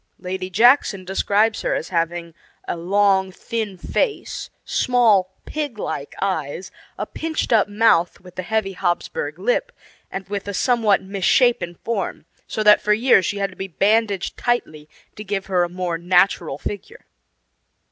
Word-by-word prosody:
Lady 185 Hz, 0 st, -5 dB
Jackson 210 Hz, -1 st, +4 dB
describes 205 Hz, +3 st, +1 dB
her -, -, 0 dB
as -, -, -4 dB
having 170 Hz, -1 st, -2 dB, 0.3 s
a -, -, -2 dB
long, 190 Hz, +2 st, +2 dB
thin 210 Hz, 0 st, -4 dB
face, 420 Hz, -, -2 dB, 0.2 s
small, 215 Hz, -7 st, +2 dB
pig 295 Hz, -7 st, -4 dB
like 145 Hz, -8 st, -5 dB
eyes, 185 Hz, -2 st, -3 dB, 0.3 s
a -, -, -3 dB
pinched 315 Hz, -6 st, -2 dB
up 215 Hz, -3 st, +4 dB
mouth, 205 Hz, -5 st, +2 dB
with 180 Hz, -1 st, -15 dB
the 185 Hz, -, -4 dB
heavy 195 Hz, +1 st, -1 dB
Hapsburg 185 Hz, -, -2 dB
lip, -, -, 0 dB, 0.4 s
and 195 Hz, -1 st, -6 dB
with 200 Hz, 0 st, -4 dB
a 200 Hz, -, -3 dB
somewhat 225 Hz, -5 st, +2 dB
misshapen 195 Hz, 0 st, +2 dB
form, 215 Hz, -8 st, -3 dB, 0.2 s
so 215 Hz, -, -2 dB
that 210 Hz, 0 st, +7 dB
for 210 Hz, -, +3 dB
years 220 Hz, -4 st, +4 dB
she 205 Hz, -, -2 dB
had 195 Hz, -1 st, -1 dB
to -, -, -15 dB
be 190 Hz, +1 st, -5 dB
bandaged 200 Hz, +1 st, +1 dB
tightly 155 Hz, -11 st, -2 dB, 0.3 s
to 210 Hz, -, -7 dB
give 195 Hz, -2 st, -3 dB
her 180 Hz, -2 st, +1 dB
a 175 Hz, -, -2 dB
more 175 Hz, -2 st, -3 dB
natural 175 Hz, -4 st, +2 dB
figure. 200 Hz, +5 st, -7 dB
195 Hz, 155 wpm, -21 LUFS, 180-220 Hz, 0.4 s, that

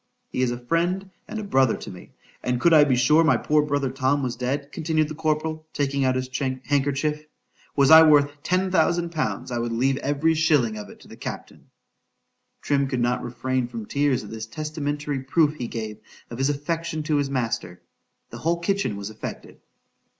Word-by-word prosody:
He -, -, -2 dB
is 130 Hz, -, +2 dB
a 120 Hz, -, -3 dB
friend 175 Hz, +9 st, -1 dB, 0.2 s
and -, -, -6 dB
a 215 Hz, -, -4 dB
brother 135 Hz, -, +2 dB
to -, -, -8 dB
me,—and 125 Hz, -1 st, -6 dB
could 170 Hz, +5 st, +4 dB
I 155 Hz, -2 st, +8 dB
be 140 Hz, -3 st, +2 dB
sure 150 Hz, +6 st, +4 dB
my 160 Hz, -, +4 dB
poor 150 Hz, 0 st, +2 dB
brother 145 Hz, -3 st, -1 dB
Tom 135 Hz, +1 st, 0 dB
was 125 Hz, -2 st, -2 dB
dead,—continued 145 Hz, +4 st, -1 dB
the -, -, -5 dB
corporal, 155 Hz, 0 st, -2 dB
taking 140 Hz, -1 st, 0 dB
out 130 Hz, -1 st, +2 dB
his 130 Hz, 0 st, -2 dB
handkerchief,—was 140 Hz, +2 st, -1 dB
I 160 Hz, 0 st, +11 dB
worth 145 Hz, -2 st, +4 dB
ten 185 Hz, +3 st, 0 dB
thousand 170 Hz, -1 st, +2 dB
pounds, 125 Hz, -5 st, -3 dB
I 120 Hz, -, -1 dB
would 115 Hz, 0 st, -2 dB
leave 130 Hz, +4 st, +1 dB
every 145 Hz, +3 st, +1 dB
shilling 150 Hz, -8 st, +2 dB
of 105 Hz, -, -8 dB
it -, -, -14 dB
to -, -, -16 dB
the -, -, -12 dB
captain.——Trim 140 Hz, -1 st, -6 dB
could 130 Hz, -2 st, -2 dB
not 125 Hz, +1 st, 0 dB
refrain 130 Hz, +1 st, -2 dB
from 115 Hz, -3 st, -7 dB
tears 140 Hz, 0 st, 0 dB
at 105 Hz, -, -10 dB
this 110 Hz, 0 st, -6 dB
testamentary 145 Hz, +1 st, -3 dB
proof 150 Hz, +3 st, +2 dB
he 120 Hz, -, -4 dB
gave 110 Hz, -2 st, -5 dB, 0.3 s
of 120 Hz, -, -7 dB
his 135 Hz, +1 st, +2 dB
affection 155 Hz, +2 st, -2 dB
to 150 Hz, -1 st, +1 dB
his 140 Hz, -1 st, 0 dB
master.——The 115 Hz, -9 st, -6 dB
whole 170 Hz, +2 st, +1 dB
kitchen 185 Hz, -, -1 dB
was 100 Hz, +1 st, -6 dB
affected. 110 Hz, -, -8 dB
145 Hz, 180 wpm, -24 LUFS, 125-155 Hz, 0.3 s, I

